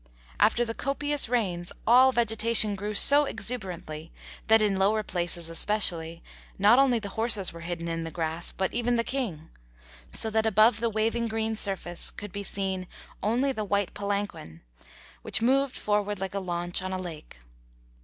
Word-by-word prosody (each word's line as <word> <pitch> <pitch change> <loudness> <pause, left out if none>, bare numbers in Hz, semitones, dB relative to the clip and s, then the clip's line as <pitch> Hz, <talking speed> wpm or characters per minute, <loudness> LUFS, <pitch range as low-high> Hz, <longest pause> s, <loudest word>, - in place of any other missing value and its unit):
After 225 +3 +3
the 225 - -4
copious 290 +1 -1
rains 185 -8 -1
all 255 +3 +6
vegetation 225 -2 +3
grew 205 +2 -5
so 290 +7 +6
exuberantly 175 - -2 0.4
that, 220 0 +6
in 205 -3 +1
lower 210 +3 +2
places 175 -3 -3
especially, 165 -2 0 0.3
not 210 +6 +5
only 265 -3 +4
the 205 -3 -5
horses 215 -3 +1
were 170 - -10
hidden 170 0 -5
in 165 0 -3
the 165 - -5
grass, 165 +1 -4
but 190 0 -3
even 240 0 0
the 230 - +1
King; 210 - -4 0.6
so 220 - 0
that 220 +1 +1
above 220 +1 +4
the 235 0 0
waving 225 +2 0
green 220 0 -2
surface 190 -5 -1
could 205 -2 -9
be 200 - -5
seen 190 -2 -2 0.3
only 245 +7 +1
the 220 -5 -3
white 200 -2 -1
palanquin, 200 - -4 0.6
which - - -1
moved 270 +2 +2
forward 205 0 -1
like 190 0 -4
a 200 - -2
launch 175 -1 -3
on 185 0 -5
a 185 - -2
lake. 165 - -9
205 Hz, 165 wpm, -27 LUFS, 175-230 Hz, 0.6 s, all